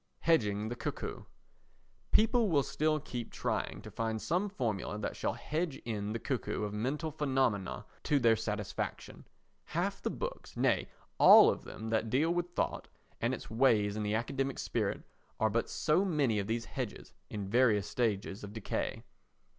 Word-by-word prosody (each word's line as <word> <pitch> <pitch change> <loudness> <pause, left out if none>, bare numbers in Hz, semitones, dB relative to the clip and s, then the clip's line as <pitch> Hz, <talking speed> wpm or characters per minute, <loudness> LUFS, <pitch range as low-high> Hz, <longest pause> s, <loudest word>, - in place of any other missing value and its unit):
Hedging 110 -10 +2
the 120 - -3
Cuckoo - - -5 0.9
People 225 0 +4
will 145 -5 +3
still 155 +2 +1
keep 125 -5 -6
trying - - -2
to - - -9
find 110 -1 -2
some 180 - 0
formula 110 - -2
that 105 - -3
shall - - -1
hedge 155 -2 -2
in 105 -3 -2
the 115 - -1
cuckoo 120 -3 -2
of 105 -1 -3
mental 140 +9 -2
phenomena 130 -10 0 0.2
to 150 - +3
their 115 -4 +5
satisfaction. 105 -2 -4 0.4
Half - - -2
the - - -1
books—nay, - - -1 0.3
all - - +9
of - - -6
them 110 0 -6
that 110 0 +1
deal 150 +8 +2
with 175 0 -2
thought - - -1 0.3
and - - +2
its - - -6
ways 110 -4 +3
in 110 - -2
the 105 0 0
academic 135 +3 -1
spirit—are 110 -1 -2
but 115 +2 0
so 160 +4 +2
many 145 - +1
of 100 - -2
these 115 +1 -1
hedges 125 -6 -6 0.2
in 105 -2 -4
various 105 -2 +3
stages 105 -3 -1
of 100 0 -7
decay. 110 -3 -3
115 Hz, 160 wpm, -32 LUFS, 105-145 Hz, 0.9 s, all